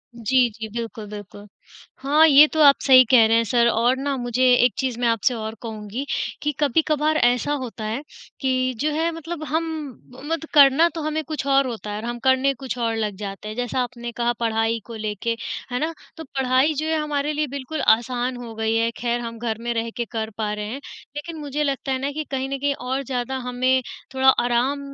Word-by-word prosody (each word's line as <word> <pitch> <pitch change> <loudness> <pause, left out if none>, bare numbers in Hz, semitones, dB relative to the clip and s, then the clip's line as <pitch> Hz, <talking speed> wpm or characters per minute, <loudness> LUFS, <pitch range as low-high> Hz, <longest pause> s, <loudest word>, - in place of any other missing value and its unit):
जी, 240 +2 +2
जी। 220 0 -7
बिल्कुल, 230 -1 -5
बिल्कुल। 205 0 -10 0.5
हाँ, 295 +4 +4
ये 295 0 +9
तो 315 - -1
आप 280 -1 +8
सही 260 -2 +8
कह 240 -4 +7
रहे 225 +1 +4
हैं 230 - +3
सर 235 +1 +2
और 235 +3 +2
ना 280 +1 -2
मुझे 245 0 -1 0.2
एक 250 - +3
चीज़ 260 -3 -2
मैं 245 - +1
आपसे 230 +2 +2
और 220 -1 -5
कहूँगी 220 +3 -5 0.4
कि 295 - 0
कभी-कभार 305 +1 +2
ऐसा 245 +1 +2
होता 230 -3 -7
है, 220 +5 -3 0.4
कि 255 -1 +1
जो 300 +2 0
है 325 +3 0
मतलब 330 0 -6
हम 320 +4 0 0.7
मत 330 0 -1
करना 285 +3 +7
तो 325 - -3
हमें 310 +1 -2
कुछ 305 -2 -5
और 275 -1 +3
होता 225 -3 -6
है 205 - -4
और 215 - -6
हम 240 0 -4
करने 260 +2 +3
कुछ 260 -1 -6
और 230 -2 0
लग 215 -3 -2
जाते 200 0 -7
हैं, 215 - -6
जैसा 245 +1 -2
आपने 240 -1 -5
कहा 240 0 0
पढ़ाई 225 0 0
को 230 - -9
लेके, 215 +1 -3 0.4
है 250 - -1
ना? 320 +3 -1 0.2
तो 320 - -7
पढ़ाई 265 +1 +1
जो 305 +1 -3
है 320 0 +1
हमारे 300 -1 -1
लिए 300 0 -1
बिल्कुल 280 +3 -5
आसान 245 +2 -3
हो 240 -2 -8
गई 220 0 0
है 230 0 +2
खैर 240 0 -1
हम 230 -1 -6
घर 225 -2 -2
में 235 0 -2
रह 230 0 -2
के 240 - -1
कर 220 -1 -4
पा 215 -2 -1
रहे 210 0 -4
हैं, 265 +5 -6 0.3
लेकिन 320 +3 -6
मुझे 295 0 -2
लगता 275 -1 -2
है 260 - 0
ना 280 +1 -1
कि 310 +2 -4
कहीं 265 0 -2
न 275 - -2
कहीं 285 +1 +1
और 260 +2 -3
ज़्यादा 260 0 -3
हमें 255 +1 +2 0.3
थोड़ा 265 0 +4
आराम 245 +3 +2
255 Hz, 220 wpm, -23 LUFS, 230-280 Hz, 0.7 s, ये